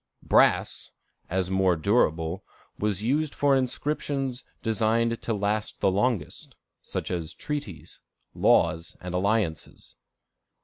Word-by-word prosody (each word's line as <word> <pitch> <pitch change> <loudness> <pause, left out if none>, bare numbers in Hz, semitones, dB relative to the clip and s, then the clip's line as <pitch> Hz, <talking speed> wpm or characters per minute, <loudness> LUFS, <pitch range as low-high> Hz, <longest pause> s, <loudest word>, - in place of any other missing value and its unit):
Brass, - - +3 0.4
as 95 +1 -1
more 95 -1 +3
durable, 80 -2 +1 0.4
was 105 -1 0
used 145 +5 0
for 140 -1 +3
inscriptions 135 0 -2 0.2
designed 115 +1 +1
to 115 - -2
last 105 +1 -2
the 95 - +3
longest, 100 - -1 0.3
such - - -5
as 85 -3 -4
treaties, 100 - -6 0.3
laws, 80 +1 +2
and 90 0 -6
alliances. 95 -3 -1
105 Hz, 105 wpm, -26 LUFS, 90-125 Hz, 0.4 s, Brass